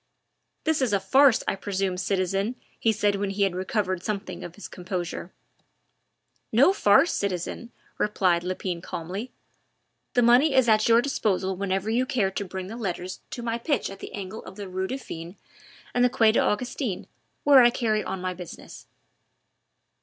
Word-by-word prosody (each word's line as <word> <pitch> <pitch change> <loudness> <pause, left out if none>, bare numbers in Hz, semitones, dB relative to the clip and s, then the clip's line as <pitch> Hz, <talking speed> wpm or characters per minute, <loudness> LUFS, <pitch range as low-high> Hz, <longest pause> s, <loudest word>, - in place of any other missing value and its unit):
"This 315 -3 +1
is 245 -5 +1
a 200 - +3
farce, 265 +6 +4
I - - +1
presume, 195 -1 -2
citizen," 195 +4 -1 0.2
he 225 - +3
said 205 -1 +1
when 200 0 -1
he 200 +1 0
had 195 -2 +1
recovered 185 0 -1
something 195 -3 -4
of 175 0 -8
his 205 - -8
composure. 180 -1 -5 1.2
"No 275 - +5
farce, 210 - +4
citizen," 200 +4 -3 0.3
replied 185 -5 +2
Lepine 180 -1 -3
calmly. 190 +10 -5 0.8
"The 245 - +4
money 255 +5 +5
is 260 -2 +5
at 215 0 +4
your 230 +1 +6
disposal 190 -8 0
whenever 195 +1 -2
you 250 +3 +1
care 200 -8 +1
to 200 - -3
bring 190 -1 -6
the 220 +5 -7
letters 185 -4 -4
to 240 - -6
my 230 0 -2
pitch 265 -5 -1
at 195 - -10
the - - -8
angle 200 +2 -6
of - - -10
the 200 -1 -7
Rue 185 +1 -3
Dauphine 175 -9 -7 0.6
and 245 - +3
the 250 - +5
Quai 230 -4 +4
des - - +2
Augustins, 230 -1 -1 0.4
where 280 -2 +8
I 240 - +7
carry 220 -3 0
on 190 - -4
my 185 0 -2
business." 180 -1 -10
200 Hz, 170 wpm, -26 LUFS, 185-235 Hz, 1.2 s, where